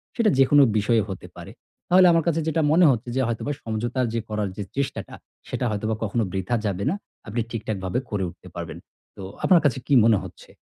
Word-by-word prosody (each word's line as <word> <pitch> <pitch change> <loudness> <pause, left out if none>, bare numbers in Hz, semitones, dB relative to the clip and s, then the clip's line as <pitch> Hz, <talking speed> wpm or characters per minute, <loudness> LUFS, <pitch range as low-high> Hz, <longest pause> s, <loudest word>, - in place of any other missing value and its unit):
সেটা 230 -3 +3
যেকোনো 140 +2 +6
বিষয়ে 110 +2 +2
হতে 95 - -7
পারে। - - -10 0.4
তাহলে 185 +1 +7
আমার 165 -1 +3
কাছে 165 -1 +1
যেটা 160 0 +1
মনে 170 +3 +5
হচ্ছে 120 -1 -3
যে 135 - +2
হয়তোবা 120 +5 -2
সমঝোতার 120 +3 -1 0.2
করার 105 -2 -2
যে 105 - -3
চেষ্টাটা, 140 0 -3 0.3
সেটা 125 - -2
হয়তোবা 110 +1 -1
কখনো 110 +2 0
বৃথা 95 +5 -1
যাবে 100 -1 -1
না। 175 - 0 0.3
আপনি 115 +3 -2
ঠিকঠাকভাবে 105 -2 -3
করে 105 -2 -2
উঠতে - - -15
পারবেন। - - -6 0.4
তো 95 - -8 0.2
আপনার 180 -3 +5
কাছে 130 -3 +2
কী - - +1
মনে 115 -2 +5
হচ্ছে? - - -12
115 Hz, 190 wpm, -24 LUFS, 105-145 Hz, 0.4 s, তাহলে